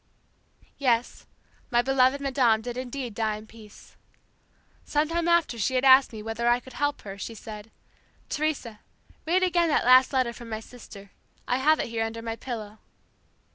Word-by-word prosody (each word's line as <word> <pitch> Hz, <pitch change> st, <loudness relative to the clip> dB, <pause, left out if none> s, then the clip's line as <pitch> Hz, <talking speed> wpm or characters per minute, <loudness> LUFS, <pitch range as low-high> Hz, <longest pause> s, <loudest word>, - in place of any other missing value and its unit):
"Yes, 245 Hz, -3 st, 0 dB, 0.4 s
my 240 Hz, 0 st, +2 dB
beloved 265 Hz, +1 st, +3 dB
madame 250 Hz, -5 st, +2 dB
did 245 Hz, 0 st, -5 dB
indeed 255 Hz, -1 st, -5 dB
die 215 Hz, 0 st, -1 dB
in 215 Hz, -, -12 dB
peace. 220 Hz, -2 st, -16 dB, 0.9 s
Sometime 330 Hz, +3 st, 0 dB
after 340 Hz, -8 st, +2 dB
she 260 Hz, +5 st, 0 dB
had 255 Hz, +1 st, +1 dB
asked 265 Hz, 0 st, +7 dB
me 215 Hz, -2 st, -8 dB
whether 225 Hz, +2 st, -3 dB
I 240 Hz, +1 st, +3 dB
could 255 Hz, +1 st, -14 dB
help 290 Hz, +2 st, -1 dB
her 200 Hz, -1 st, -9 dB
she 230 Hz, -, -6 dB
said, 215 Hz, 0 st, -10 dB, 0.6 s
'Teresa, 285 Hz, -8 st, -3 dB, 0.5 s
read 365 Hz, +3 st, +2 dB
again 345 Hz, -2 st, +2 dB
that 295 Hz, -, +1 dB
last 255 Hz, +1 st, +6 dB
letter 255 Hz, -3 st, 0 dB
from 235 Hz, -1 st, -11 dB
my 220 Hz, -1 st, -4 dB
sister. 210 Hz, -4 st, -13 dB, 0.4 s
I 250 Hz, -, +1 dB
have 305 Hz, +4 st, +3 dB
it -, -, -2 dB
here 225 Hz, -1 st, -1 dB
under 225 Hz, 0 st, -5 dB
my 225 Hz, -1 st, -4 dB
pillow.' 220 Hz, -3 st, -7 dB
245 Hz, 170 wpm, -26 LUFS, 225-270 Hz, 0.9 s, asked